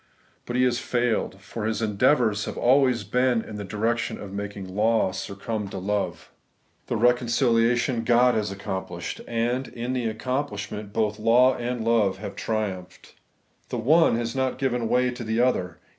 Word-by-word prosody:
But 120 - -3
he 125 - +3
has 125 -1 +2
failed; 120 -6 -1
for 110 +2 -5
his 110 - -1
endeavours 110 0 +2
have - - -6
always 125 -2 +3
been 125 +2 +1
in 105 - -8
the 105 - -5
direction 110 +4 -1
of 100 -1 -8
making 100 -1 -5
law 105 +1 +1
succumb 100 +3 -4
to 95 - -6
love. 100 +2 -3 0.6
The - - -1
reconciKatiou 120 0 +2
God 120 +1 +4
has 105 -2 0
accomplished; 95 -3 -5
and, 120 +3 -1
in 120 +2 -4
the 125 -3 -1
accomplishment, 110 -3 -3
both 105 0 -1
law 125 +4 +5
and 120 -1 -3
love 110 -5 +2
have 100 0 -7
triumphed. 95 -5 -4 0.6
The - - -3
one 150 +3 +4
ias 115 0 -3
not 130 -1 0
given 125 -4 -1
way 125 0 +2
to 120 0 -7
the 110 +1 -1
other. 95 -9 +1
115 Hz, 160 wpm, -25 LUFS, 105-125 Hz, 0.6 s, law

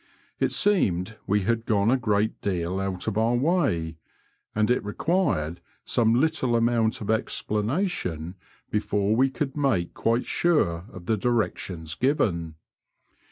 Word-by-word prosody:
It - - +2
seemed 110 - +1
we 105 +1 +2
had 115 +4 -1
gone 105 +1 +3
a - - +5
great 110 -3 0
•deal 90 0 -1
out 95 -2 -3
of 110 -1 -1
our 115 +2 +2
way, 115 - +1 0.6
and 110 +2 +2
it 125 - +1
required 105 - 0 0.2
some 115 -1 +2
little 145 -5 +1
amount 115 -1 +1
of 105 - -1
explanation 105 - -1 0.4
before 105 0 +1
we 130 +3 +3
could 135 +1 -3
make 135 -13 0
quite 115 +2 0
sure 90 - +1
of 90 -3 -10
the 110 +4 +1
directions 95 -7 -1
given. 85 - 0
110 Hz, 135 wpm, -26 LUFS, 90-125 Hz, 0.6 s, a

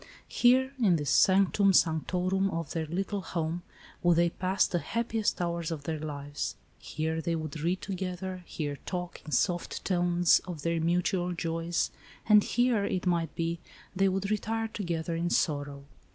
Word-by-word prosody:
Here, 260 +2 +3
in 195 -6 +5
this 145 -3 -1
sanctum 195 +3 +4
sanctorum 180 +4 +2
of 165 -4 -4
their 160 -2 -2
little 195 +4 -2
home, 165 -1 -3 0.4
would 175 -1 +4
they 170 0 +3
pass 185 +2 +1
the 175 - -1
happiest 230 +1 -1
hours 170 -2 -1
of 160 -4 -4
their 160 0 -3
lives. 145 -1 -4 0.2
Here 160 +1 -3
they 165 +1 -1
would 155 -1 -5
read 175 +4 0
together, 185 -1 -4
here 145 -3 -4
talk, 180 -1 -4
in 155 - -9
soft 175 +2 0
tones, 175 -2 +3
of 165 -5 -6
their 165 -1 0
mutual 180 +1 +1
joys, 165 0 -1 0.4
and 210 -1 +7
here, 240 -3 +2
it 185 -2 -2
might 170 -2 0
be, 165 0 -2 0.4
they 195 +1 +3
would 195 +2 -2
retire 225 +1 -1
together 170 -6 -3
in 170 +1 -1
sorrow. 145 -4 -1
175 Hz, 160 wpm, -29 LUFS, 165-190 Hz, 0.4 s, and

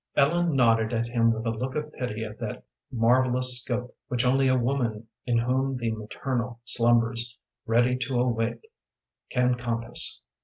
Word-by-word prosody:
Ellen 165 +2 +2
nodded 115 -3 +3
at 115 0 0
him 115 -1 +2
with 115 0 -3
a 115 - +1
look 125 +4 -4
of 150 0 -4
pity 115 -4 -4
of 110 -1 -8
that - - -5 0.3
marvellous 125 +1 +4
scope 125 +1 -4
which 125 0 0
only 135 +2 +3
a 130 0 +3
woman 120 -3 -1 0.2
in 120 -1 +2
whom 130 +3 0
the 115 -2 -1
maternal 120 +2 -4
slumbers 120 0 +1 0.3
ready 120 +2 +3
to 125 0 -1
awake 120 - -1 0.6
can 125 -1 +2
compass. 120 -1 -2
120 Hz, 155 wpm, -26 LUFS, 115-130 Hz, 0.6 s, marvellous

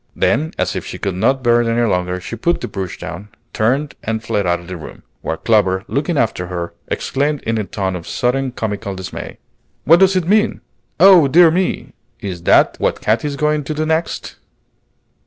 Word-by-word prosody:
Then, 160 +2 +1
as - - -1
if - - -3
she - - -7
could 100 - -2
not 125 +8 +1
bear 120 -1 +4
it 120 - -1
any 115 +1 +1
longer, 90 -2 -1
she 95 - -7
put 170 +10 0
the - - -4
brush 95 -3 -5
down, 90 +6 -8 0.2
turned, 135 +6 0
and 110 0 -3
fled 100 -4 -1
out 85 0 +1
of 85 - -13
the 90 +1 -7
room; 80 - -10 0.2
while 80 - -3
Clover, 95 -3 +2
looking 145 +4 -1
after 105 -7 0
her, 85 -1 -5
exclaimed 145 +1 -1
in 115 -1 -1
a - - -1
tone 95 -2 -3
of 85 -2 -7
sudden 130 +2 0
comical 105 -4 -4
dismay, 95 0 -7 0.5
"What 165 +3 +6
does 190 0 +4
it 180 -3 0
mean? 215 +3 +2 0.4
Oh, 180 -4 +8
dear 165 +4 +6
me! 165 -7 -1 0.3
is 95 -5 -5
that - - +5
what - - 0
Katy 110 +6 +1
is 145 - -3
going 150 +1 0
to 155 - -3
do 155 +1 -1
next?" 160 +1 -2
115 Hz, 200 wpm, -18 LUFS, 95-150 Hz, 0.5 s, Oh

